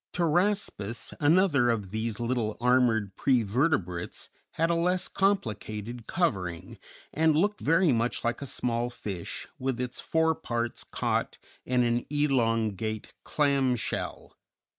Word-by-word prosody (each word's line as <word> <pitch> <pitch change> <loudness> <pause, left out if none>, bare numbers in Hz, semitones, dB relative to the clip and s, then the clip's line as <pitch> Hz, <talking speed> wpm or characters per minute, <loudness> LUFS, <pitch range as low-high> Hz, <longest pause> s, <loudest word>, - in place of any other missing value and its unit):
Pteraspis, 175 - 0
another 150 -5 +4
of 105 -5 -1
these 110 +1 -3
little 115 -2 -1
armored 120 -5 +2
prevertebrates, 115 - 0 0.2
had 165 +1 +1
a - - +2
less 180 +2 +1
complicated 115 - -2
covering, 95 - -2 0.3
and 160 -1 +3
looked 205 +5 +1
very 165 +1 +4
much 115 0 0
like 120 +3 -1
a 140 - -4
small 120 -1 -1
fish 100 -7 -6
with 130 -1 -2
its 125 -1 -3
fore 160 0 +2
parts 120 -5 -3
caught - - -2 0.3
in 125 -1 +3
an 120 0 0
elongate 115 -7 0
clam 140 -4 +2
shell. 120 - -4
125 Hz, 120 wpm, -28 LUFS, 110-155 Hz, 0.3 s, another